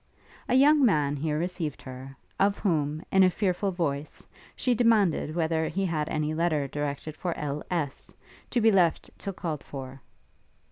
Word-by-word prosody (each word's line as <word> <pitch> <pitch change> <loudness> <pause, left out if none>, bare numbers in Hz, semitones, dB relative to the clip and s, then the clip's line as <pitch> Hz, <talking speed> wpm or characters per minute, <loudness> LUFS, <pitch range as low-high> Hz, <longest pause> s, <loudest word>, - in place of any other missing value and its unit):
A - - +3
young 290 +2 +6
man 150 - +3
here 150 +1 -1
received 170 -3 -3
her, 130 +1 -9 0.2
of 200 +1 +3
whom, 155 -5 0
in 190 - +5
a 185 - +7
fearful 190 +1 0
voice, 155 -5 -3 0.3
she 250 - +1
demanded 215 -9 +2
whether 160 -1 +1
he 195 +5 -1
had 155 -3 -1
any 155 0 -1
letter 155 -3 +1
directed 145 +2 -4
for 175 0 -3
L.S., 150 +1 -3 0.4
to 245 - +1
be 225 -1 +5
left 180 -5 +2
till 195 - -4
called 160 -5 -4
for. 135 -1 -8
160 Hz, 155 wpm, -27 LUFS, 150-190 Hz, 0.4 s, a